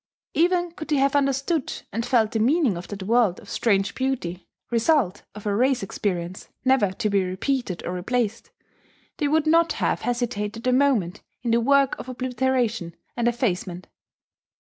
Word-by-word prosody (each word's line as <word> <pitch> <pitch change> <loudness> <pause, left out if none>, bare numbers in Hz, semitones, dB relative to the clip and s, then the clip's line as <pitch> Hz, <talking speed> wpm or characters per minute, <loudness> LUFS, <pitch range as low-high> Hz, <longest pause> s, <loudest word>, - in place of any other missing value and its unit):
Even 350 +1 +2
could 315 -2 -8
they 300 - +1
have 275 0 +2
understood 275 +2 0
and 230 +3 -1
felt 230 -3 +2
the 225 - -1
meaning 260 - +3
of 175 +1 -7
that 205 -2 -6
world 220 -3 +2
of - - -12
strange 200 -4 +1
beauty, 240 -10 -3 0.2
result 235 - +2
of 210 - -10
a 205 - +1
race 255 +1 +2
experience 185 -2 -3 0.2
never 260 -7 +3
to 215 +2 -1
be 200 -2 +2
repeated 190 +2 -2
or 175 - -3
replaced, 225 +4 -2 0.7
they 300 -5 +1
would 310 +1 +2
not 330 +1 +4
have - - 0
hesitated 230 -2 -2
a 255 - +3
moment 250 -10 +2 0.2
in 235 - 0
the 235 +1 +3
work 275 +2 +3
of 255 - -7
obliteration 250 -7 -1 0.2
and 240 -1 0
effacement. 185 -7 -1
240 Hz, 165 wpm, -24 LUFS, 200-270 Hz, 0.7 s, not